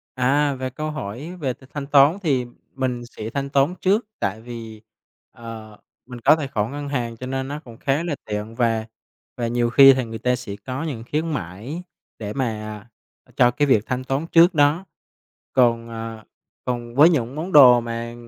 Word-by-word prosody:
À, 140 +3 +2
về 130 0 -4
câu 155 +5 -4
hỏi 145 - -6
về 130 -4 -1
th - - -22
thanh 140 -2 -5
toán 145 +4 +5
thì 135 -6 +1 0.3
mình 130 -2 -2
sẽ 110 -2 -7
thanh 140 +3 -3
toán 140 +5 +2
trước, 205 +4 +2
tại 105 +3 -2
vì, 115 -2 -9 0.5
ờ, 110 -2 -10 0.3
mình 125 -1 -9
có - - +6
tài 155 -3 -4
khoản 110 -2 -2
ngân 145 0 -5
hàng 120 -4 -3
cho 125 - -7
nên 130 0 -3
nó 145 +2 -5
cũng 120 -7 -14
khá 140 +4 0
là 165 -4 -2
tiện, 105 +1 -5
và 115 -2 +1 0.5
và 120 - -1
nhiều 120 0 +1
khi 135 +2 +8
thì 130 -1 -1
người 115 0 -7
ta 125 +2 +1
sẽ 100 -5 -7
có 130 +4 -4
những 130 -8 -4
khuyến 160 +2 -1
mãi 115 - -6 0.4
để 105 -2 -5
mà, 135 -2 0 0.8
à, - - -23
cho 125 -1 +5
cái 145 +4 +1
việc 110 -6 +4
thanh 130 0 -2
toán 135 +5 -2
trước 170 +2 +6
đó. 150 +4 +3 0.7
Còn, 115 -2 +3
à 115 -1 -7 0.4
còn 120 -1 -4
với 150 +6 +7
những 130 -5 -1
món 170 +5 -5
đồ 125 -5 +8
mà 115 0 -5
130 Hz, 195 wpm, -22 LUFS, 115-145 Hz, 0.8 s, khi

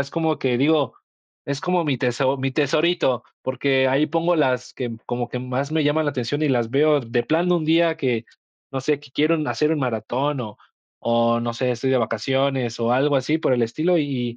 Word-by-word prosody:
Es 140 0 -3
como 160 -2 0
que 130 -4 0
digo, 145 0 +2 0.5
es 140 0 -3
como 180 -2 0
mi 140 -4 0
teso 130 +2 +1
mi 135 +1 -1
tesorito, 150 -3 +1 0.2
porque 130 +1 +1
ahí 140 +4 +2
pongo 170 +3 +1
las 125 -4 0
que 120 -3 -4
como 120 0 -3
que 125 - -4
más 130 +3 -3
me 160 -1 +1
llaman 150 +2 +2
la - - +2
atención 130 +3 -2
y 155 - +2
las 120 -4 +1
veo 150 +2 +3
de 120 0 -1
plano 170 +3 +1
de - - +4
un 160 - -4
día 165 0 +3
que, 125 -6 -1 0.5
no 135 -1 -3
sé, 145 +2 0
que 145 -2 -16
quiero 155 +4 +2
hacer 150 +1 +1
un 160 - 0
maratón 130 +3 -1
o 105 -4 -7 0.5
o 115 0 +2
no 120 0 -3
sé, 125 +2 -1
estoy 125 +2 -2
de 130 - +3
vacaciones, 125 +2 0
o 115 0 +1
algo 140 +3 +3
así 145 +4 0
por 135 - +1
el 120 - +1
estilo, 155 +10 +1
y 125 -5 -2
135 Hz, 215 wpm, -22 LUFS, 125-150 Hz, 0.5 s, de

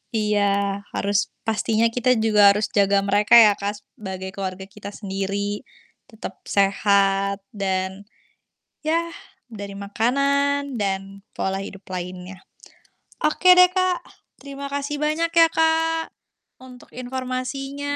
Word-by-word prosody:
Iya, 200 -2 +1
harus 200 0 0 0.2
pastinya 225 0 +1
kita 250 +1 +1
juga 210 -2 +5
harus 205 +1 +2
jaga 200 0 +4
mereka 205 +2 +2
ya, 205 - +5
Kak, 205 +1 -4
sebagai 190 -2 -8
keluarga 190 -1 -5
kita 200 +1 -10
sendiri. 200 0 -3 0.5
Tetap 220 -2 -8 0.2
sehat 200 0 +2 0.2
dan, 190 0 -3 0.7
yah, 335 +2 -1 0.4
dari 200 -2 -7
makanan 280 +5 0
dan 195 0 -3 0.2
pola 190 0 -2
hidup 195 0 -9
lainnya. 180 +1 -6 0.9
Oke 360 +4 +5
deh 365 0 +8
Kak, 370 -1 +1 0.4
terima 280 0 -8
kasih 285 +1 -3
banyak 320 +2 0
ya 330 -1 +7
Kak, 325 0 +1 0.5
untuk 250 -1 -14
informasinya 260 +3 -4
210 Hz, 115 wpm, -22 LUFS, 195-280 Hz, 0.9 s, deh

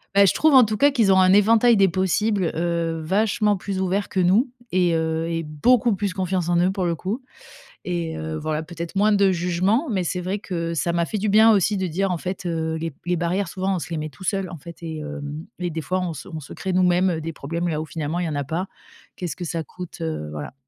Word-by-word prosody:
Beh, 200 - +7
je 190 - +4
trouve 310 -2 +3
en 255 - +9
tout 215 - -2
cas 285 +1 +5
qu'ils 225 -8 +3
ont 190 - +5
un 185 0 +5
éventail 225 +3 +5
des 195 -1 +5
possibles, 190 +1 +1
heu, 165 -1 -1
vachement 210 +2 +2
plus 190 0 -4
ouvert 190 +2 -1
que 190 - -2
nous 200 +9 +3 0.2
et 180 -2 +2
heu 160 0 -1
et 165 0 -2
beaucoup 220 - +2
plus 200 -2 -2
confiance 185 -2 -1
en 175 - +3
eux 180 +2 +3
pour 190 -2 -2
le 170 -1 0
coup 210 - -4 0.6
et 170 -3 -3
heu, 160 0 -4
voilà, 155 0 -2
peut-être 170 +1 -7
moins 210 +2 +3
de 200 -2 +4
jugement. 185 - +1
Mais 190 -4 0
c'est 180 +2 -2
vrai 190 +3 -2
que 170 -4 -3
ça 170 +2 0
m'a 170 0 +1
fait 210 +4 -3
du 210 +2 -1
bien 220 +2 +6
aussi 205 +1 +2
de 190 -1 -1
dire, 190 +3 0
en 175 - -2
fait, 185 +1 -5
heu, 160 -1 -1
les 165 +1 -3
b - - -22
les 180 0 +1
barrières 175 +3 -1
souvent, 190 +1 -1
on - - -1
se 170 - -7
les 165 - -2
met 155 0 -3
tout 145 - -15
seul, 195 -2 -1
en 170 - -8
fait 170 +3 -11
et 160 -2 -5
heu 150 0 -6 0.4
et 175 -1 -2
des 160 0 -4
fois 185 +6 -1
on 180 -2 -2
se 145 - -9
on 160 -4 -6
se 140 - -11
crée 190 - -4
nous-mêmes 180 -1 +3
des 165 +1 -5
problèmes 165 +4 -4
là 155 -1 -1
où, - - -3
finalement, 160 +2 -3
il 175 - -1
y - - -2
en 155 - -3
a 140 - -1
pas. 170 +6 -3 0.5
Qu'est-ce 175 -5 -4
que 180 - -5
ça 165 -1 -3
coûte, 180 -1 -10
heu, 155 - -3
voilà. 75 - -7
180 Hz, 265 wpm, -23 LUFS, 165-195 Hz, 0.6 s, en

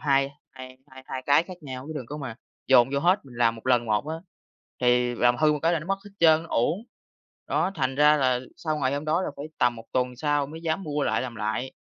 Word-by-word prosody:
hai 140 -2 +2 0.2
hai 130 -1 -11 0.3
hai 130 0 -5
cái 145 +3 +5
khác 180 0 -10
nhau, 130 -2 -7
chứ - - -4
đừng 125 -5 -6
có 145 - -6
mà 135 -6 -6 0.3
dồn 130 -1 +6
vô 140 - +1
hết, 180 +2 +2
mình 120 -2 -13
làm 115 -1 +3
1 115 - -13
lần 120 -2 +3
một 110 +7 0
á 160 - -3 0.6
thì 125 0 +3
làm 120 +1 +3
hư 155 -1 +4
một 150 - -1
cái 165 +1 +3
là - - +1
nó 165 - -9
mất 195 0 0
hết 205 - -11
trơn, 160 -1 +5
nó 165 - -12
uổng. 170 - 0 0.6
Đó, 195 - 0
thành 130 -3 -1
ra 150 +1 +6
là 130 -2 +2 0.2
sau 155 -2 -2
ngày 135 0 0
hôm 145 +2 -3
đó 165 +4 +1
là - - -2
phải 145 - -6
tầm 120 -1 +2
1 115 - -10
tuần 125 -1 0
sau 145 +1 0
mới 160 +3 -9
dám 160 +3 -1
mua 150 -2 -2
lại - - 0
làm 120 -3 -6
lại, 110 +5 -3
140 Hz, 260 wpm, -26 LUFS, 125-155 Hz, 0.6 s, dồn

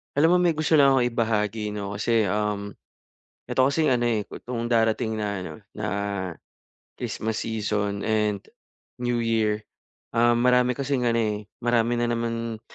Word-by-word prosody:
Alam 160 +5 +5
mo - - +5
may 170 - +4
gusto 155 0 +1
lang 140 -2 +6
akong 130 -2 +3
ibahagi 110 -2 -1
'no 100 -1 -4
kasi, 110 +1 +2
um, 105 0 -2 0.7
'eto 130 - +2
kasing 145 +4 +2
ano, 125 -3 +2
eh, 110 -4 0
itong 120 -1 -5
darating 115 -1 +1
na 105 -1 -2
ano, 90 - -6 0.2
na 105 0 -4 1.1
Christmas 110 0 -3
season 105 -2 -2
and 105 -2 0 0.6
New 120 -1 0
Year, 110 -2 +1 0.5
ah, 120 0 +4
marami 125 0 +3
kasing 140 -1 -1
ano, 115 - +1
eh, 105 -2 0 0.3
marami 120 0 +2
na 120 - +1
naman 115 -1 -3
115 Hz, 150 wpm, -25 LUFS, 105-120 Hz, 1.1 s, lang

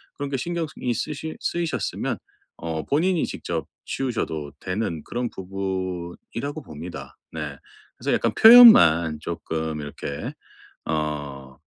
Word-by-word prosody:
그런 145 -1 -4
게 135 - 0
신경쓰 170 +1 -3
이 125 - 0
쓰시 155 +4 -4
쓰이셨으면 160 - -2 0.4
어 80 -1 -4
본인이 170 +4 +1
직접 - - -4 0.2
치우셔도 80 - -3
되는 90 -4 -3
그런 120 0 -3
부분이라고 95 - -5
봅니다. 80 - -9 0.2
네. - - -5 0.4
그래서 - - -1
약간 - - +2
표현만 85 - +9
조금 80 -2 -4
이렇게 70 -1 -6 0.6
어 75 -4 -3
95 Hz, 260 characters per minute, -24 LUFS, -, 0.6 s, 표현만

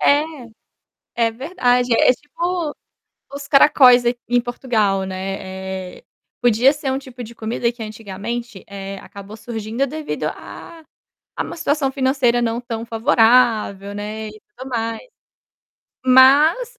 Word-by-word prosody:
É, 290 +1 +4 1.1
é 225 - -3
verdade, 250 -2 0
é 230 - +5
tipo, 335 +3 -4 0.6
os 280 0 -7
caracóis 255 -3 +6
aqui 240 0 +1
em 245 0 +3
Portugal, 220 -5 -1
né. 190 0 -6
Eh, - - -22 0.4
podia 245 +2 +4
ser 290 -2 -4
um 265 - -1
tipo 255 -2 -10
de 235 0 -10
comida 235 +1 -2
que 235 -1 -10
antigamente, 215 +1 -6
eh, 195 0 -7
acabou 200 +1 -11
surgindo 225 +2 -3
devido 305 +2 -5
a 330 -1 -8 0.5
a - - -2
uma - - -7
situação 295 -4 0
financeira 260 -3 +1
não 230 0 -1
tão 235 -2 -6
favorável, 225 -4 +2
né, 215 +1 -5
e 215 0 -12 0.2
tudo 260 +1 -8
mais. 230 -2 -2 1.1
Mas, 295 - +5
240 Hz, 130 wpm, -20 LUFS, 215-270 Hz, 1.1 s, caracóis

